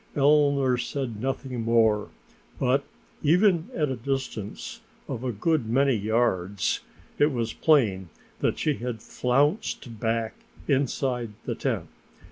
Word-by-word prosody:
Eleanor 140 -3 +4
said 120 -5 -3
nothing 130 -1 -3
more, 110 -2 +3 0.5
but - - +2 0.4
even 175 +2 +3
at 150 -3 +1
a - - -1
distance 125 -4 -4 0.3
of 120 - -4
a 130 - -1
good 135 +3 0
many 135 +3 +3
yards 100 -4 0 0.4
it 145 +1 +4
was 115 -3 -2
plain 105 - +3 0.3
that - - +1
she 155 - +1
had 120 -1 -4
flounced 125 - 0
back 115 0 0 0.3
inside 130 -4 0
the - - -1
tent. - - -2
125 Hz, 120 wpm, -26 LUFS, 110-140 Hz, 0.5 s, Eleanor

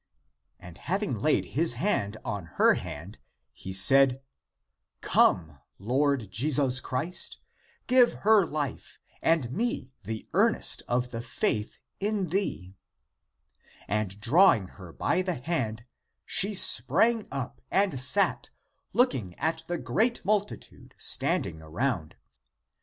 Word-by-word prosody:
And 90 0 -13
having 195 -2 -2
laid 155 +8 +1
his 165 +3 +3
hand 110 - -2
on 100 -5 -4
her - - +5
hand, - - -8 0.3
he 95 - -9
said, 130 +7 +5 0.8
"Come, 80 -5 +2 0.2
Lord 130 -1 -1
Jesus 130 +2 +2
Christ, 150 +9 -1 0.5
give 250 -1 +4
her 215 -2 +6
life 150 -5 -5 0.2
and 160 -8 +1
me 190 - -3
the 110 +2 -6
earnest - - +3
of 125 0 -1
the 115 -1 -5
faith 110 -2 -2 0.2
in 200 -3 -2
thee," 155 - -3 1.1
And 105 -1 -3
drawing 115 - +4
her 95 -4 -13
by 185 - 0
the 180 -2 -2
hand, 120 -6 -3 0.4
she 200 +2 +2
spraung 195 - +3
up, 130 -2 -6
and 195 -9 +1
sat, 135 +11 +2 0.4
looking 125 - 0
at 160 +2 -2
the 175 - -2
great 215 - -1
multitude 205 0 -3
standing 80 -1 0
around. 85 - -3
135 Hz, 115 wpm, -27 LUFS, -, 1.1 s, her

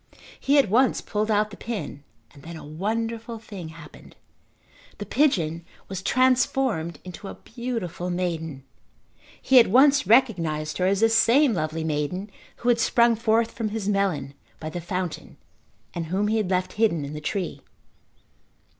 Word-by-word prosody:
He 280 +2 +2
at 275 - +5
once 250 +6 +3
pulled 215 0 -2
out 210 0 +2
the - - -9
pin 205 -11 -6 0.3
and 140 - -15
then 170 +3 -9
a 160 - -10
wonderful 225 +8 -3
thing 200 -6 -9
happened. 160 - -14 0.8
The - - -6
pigeon 170 - +1 0.2
was 190 -1 -5
transformed 255 - +1
into 180 +2 -9
a - - -7
beautiful 225 -7 -5
maiden. 165 -6 -3 0.8
He 265 -1 +6
at 235 - +6
once 280 +6 +5
recognised 170 -12 +2
her 185 - +2
as 195 +1 +1
the 225 - +5
same 235 +4 +4
lovely 155 -2 -2
maiden 160 +6 -2 0.2
who 240 - -2
had 235 -1 +3
sprung 235 0 +4
forth 225 0 +1
from 225 -2 -3
his 210 -2 -4
melon 185 -9 0 0.3
by 155 0 -6
the 175 - -5
fountain 180 0 -5 0.6
and 170 -2 -4
whom 195 +5 0
he 220 - +1
had 210 -4 -1
left 185 -1 0
hidden 205 -9 +1
in 140 - -7
the 150 - -6
tree. 180 +3 -3
200 Hz, 160 wpm, -25 LUFS, 165-230 Hz, 0.8 s, He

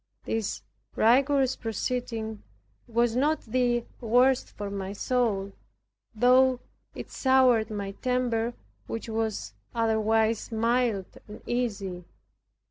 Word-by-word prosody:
This 220 - -2 0.3
rigorous 265 +3 +3
proceeding 225 -1 -3 0.5
was 235 0 +1
not 295 +5 +2
the 240 0 0
worst 250 +2 +3
for 205 -1 -6
my 195 -1 -4
soul, 210 -4 0 0.6
though 255 +2 +5 0.4
it - - -8
soured 260 -4 +3
my 200 -2 -4
temper, 240 0 -1 0.3
which 230 - -5
was 220 - -2 0.2
otherwise 225 0 +1
mild 230 -3 0
and 210 +1 -11
easy. 200 -7 -2
230 Hz, 100 wpm, -27 LUFS, 215-250 Hz, 0.6 s, though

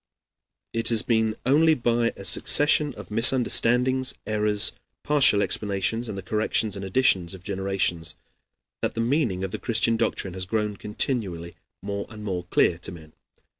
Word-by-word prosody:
It 115 0 +2
has 115 -2 +3
been 110 -2 +1
only 155 +5 +4
by 120 -2 0
a 100 - -9
succession 145 +2 +1
of - - -11
misunderstandings, 125 +2 +3
errors, 105 -1 +2 0.3
partial 135 -9 +4
explanations, 105 +3 -1
and 100 - -5
the 95 - -6
corrections 105 +1 0
and 100 - -7
additions 95 -4 +1
of 90 - -14
generations 95 -4 -2 0.7
that - - -2
the - - -4
meaning 115 - 0
of 95 - -4
the - - -5
Christian 115 0 +1
doctrine 95 -4 -2
has 95 0 -3
grown 105 0 -1
continually 100 -6 -3 0.3
more 100 0 -4
and 105 -1 -10
more 90 -4 -4
clear 85 -1 +1
to - - -5
men. 80 -3 -13
105 Hz, 155 wpm, -24 LUFS, 95-120 Hz, 0.7 s, only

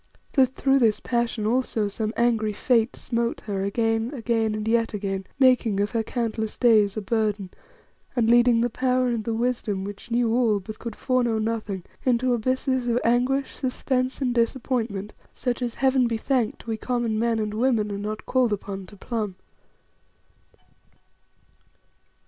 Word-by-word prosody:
That 260 -1 +3
through 275 0 +3
this 225 -4 +3
passion 235 -3 -1
also 225 -2 +1
some 215 +1 -3
angry 225 -3 +2
fate 230 +2 +1
smote 235 -1 -2
her 200 -2 -3
again, 225 +3 0
again, 225 -3 0
and 215 0 -4
yet 230 -1 +1
again, 195 -2 -3
making 250 -6 +4
of 205 +1 0
her 230 - 0
countless 220 -1 -3
days 215 -4 +4
a - - -1
burden, 210 -3 -1 0.6
and 235 -3 +2
leading 240 0 +5
the 240 - +1
power 255 +1 +1
and 230 -2 -1
the 230 - -1
wisdom 225 -5 -1
which 205 +3 -8
knew 235 -1 +1
all 230 -4 +3
but 215 +3 -9
could 230 -2 -6
foreknow 245 -3 +1
nothing, 215 -4 -2 0.2
into 250 0 +2
abysses 255 +1 0
of 240 0 +2
anguish, 250 +4 +1
suspense, 255 0 -1
and 250 -2 +1
disappointment 230 -4 -1 0.2
such 245 0 -2
as 240 -2 -2
Heaven 265 -2 +3
be 230 -1 -1
thanked! 245 -1 -1
we 225 -1 -2
common 235 -2 -1
men 230 0 +1
and 210 -1 -2
women 220 -2 +1
are 200 - -4
not 215 +1 -5
called 255 -3 +2
upon 195 -2 -4
to 205 - -14
plumb. 210 -2 -3
230 Hz, 160 wpm, -25 LUFS, 215-245 Hz, 0.6 s, leading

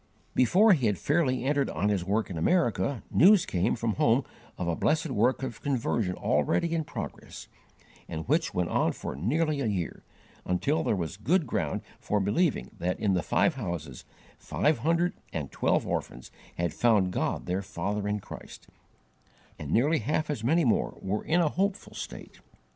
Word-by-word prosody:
Before 190 - +5
he 135 -9 +2
had 105 -3 +1
fairly 130 - +1
entered 140 0 +1
on 95 +7 0
his 100 -4 0
work 105 +3 -1
in - - -4
America, 120 - +1
news 195 +2 +6
came 95 +5 0
from 115 -2 -1
home 120 +3 +3 0.3
of 90 - -3
a 85 - 0
blessed 155 - +1
work 125 +3 +2
of 120 -5 -5
conversion 115 -8 0
already 75 - +1
in 160 -2 -1
progress, - - -7 0.6
and 80 0 -5
which 160 +5 +1
went 90 -1 -1
on - - +2
for - - -6
nearly 145 - 0
a 125 - 0
year, 95 -6 -3 0.4
until 135 - 0
there 110 - +1
was 85 -1 -4
good 165 - +1
ground - - -2 0.2
for 105 - 0
believing 105 - 0
that 90 +1 -1
in 100 -3 +1
the 90 - +1
five 170 - +2
houses 85 - -5 0.4
five 150 +1 +1
hundred 170 +3 +1 0.2
and - - -4
twelve - - +1
orphans 60 - -4 0.3
had 85 -2 -1
found 105 -6 +3
God - - -1
their 90 +2 -1
Father 100 +1 -3
in 105 0 -1
Christ, - - -11 0.9
and 75 - -6
nearly 145 - +3
half 150 +5 -1
as 115 -7 -4
many 160 +6 +3
more 115 - +1
were 100 +3 -2
in 175 +3 +2
a 160 - +3
hopeful 195 +4 -2
state. - - -8
115 Hz, 175 wpm, -28 LUFS, 95-155 Hz, 0.9 s, news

